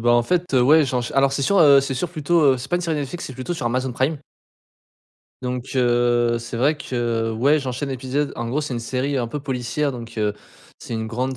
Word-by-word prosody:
ben, 120 +1 +2
en 120 - +4
fait, 180 +3 -1
heu, 125 - +5
ouais 155 +4 +6
j'ench 125 -2 -2
alors 135 0 +3
c'est 140 - -1
sûr 200 +7 +2
heu 140 -3 +7
c'est 135 0 -3
sûr 145 +7 -2
plutôt 165 0 +1
heu, - - -3
c'est 125 - -7
pas 175 - +1
une 180 - -3
série 165 -3 -1
Netflix 145 +4 -4
c'est 130 - -8
plutôt 130 +8 -4
sur 150 -8 -3
Amazon 125 +2 -1
prime. 130 +6 0 1.3
Donc 125 +1 -4
heu, 120 -1 +2
c'est 115 0 -7
vrai 145 +6 +2
que 120 -4 -2
ouais 140 +7 +3
j'enchaîne 135 +1 -4
l'épisode. 135 +3 -2
En 120 - -3
gros 135 +6 0
c'est 145 -3 -4
une 120 - -3
série 130 +4 -2
un 120 - -1
peu 145 +5 -5
policière 135 +2 -2
donc 120 -2 -8
heu, 105 -1 0 0.5
c'est - - -7
une 110 0 -3
grande 130 +3 -3
130 Hz, 240 wpm, -22 LUFS, 120-145 Hz, 1.3 s, heu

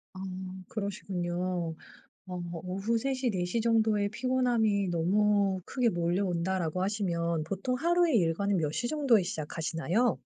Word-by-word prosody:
음 185 0 -6
그러시군요. 180 -4 -3 0.5
어 180 -1 -5 0.2
"오후 195 +5 0
3 270 +3 -1
시, 255 -1 0
4 185 -4 -1
시 225 +6 0
정도에 220 -3 +3
피곤함이 235 -4 +1
너무 195 +3 +2
크게 250 -3 +1
몰려온다."라고 175 -1 0
하시면 170 -5 0
보통 195 +9 -2
하루의 340 0 +3
일과는 190 +3 +1
몇 155 -3 0
시 240 - -2
정도에 270 -8 +3
시작하시나요? 165 - -1
195 Hz, 290 characters per minute, -30 LUFS, 175-225 Hz, 0.5 s, 정도에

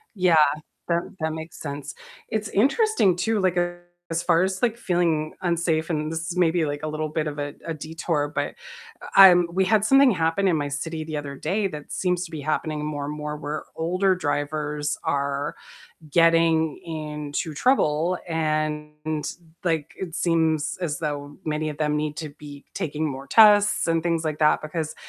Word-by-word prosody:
yeah, 180 -3 +3 0.5
that 170 0 +2 0.2
that 160 -1 -1
makes 160 +1 -8
sense, 145 -1 -6 0.3
it's 215 -1 -2
interesting 275 - +3
too, 220 +4 0
like, 185 -2 +1 0.5
as 165 +1 0
far 170 0 +3
as, 190 0 -2
like, 235 -2 +1
feeling 170 -7 0
unsafe, 170 -2 0
and 155 -1 -1
this 165 0 -4
is 180 - -4
maybe, 175 -1 +3
like, 145 0 -3
a - - -1
little 155 0 -3
bit 155 0 -1
of 150 -1 -4
a 145 0 -4
a 165 - -3
detour, 155 -1 -2
but, - - 0 0.5
uh, - - -9
I'm 180 -3 +8
we 190 +1 +2
had 215 0 +3
something 270 +2 +6
happen 165 +1 +1
in 180 - +3
my 145 -1 -1
city 155 +3 -4
the 155 -1 -5
other 140 -1 -5
day 195 +9 -1
that 150 -3 -9
seems 180 -1 0
to 165 - -12
be 155 -2 -5
happening 155 0 -2
more 145 -2 -3
and 150 - -4
more 150 0 -4
where 150 0 -5
older 185 +4 +1
drivers 150 -2 -2
are 140 +1 -1 0.6
getting 165 -1 +3
into 150 -1 -4
trouble, 175 - +2
and, 155 -1 -2 0.4
like, 160 -4 -1
it 175 -3 -5
seems 160 -3 +1
as 155 -5 -2
though 145 -2 -4
many 155 0 -1
of 150 -1 -6
them 150 -1 +1
need 150 0 -2
to 155 -2 -5
be 145 -1 -12
taking 155 +1 -2
more 135 0 -6
tests 210 +2 +6
and 165 -1 +1
things 165 -1 0
like 155 -1 -2
that, 150 0 +4
because 155 0 -4
160 Hz, 180 wpm, -24 LUFS, 150-175 Hz, 0.6 s, I'm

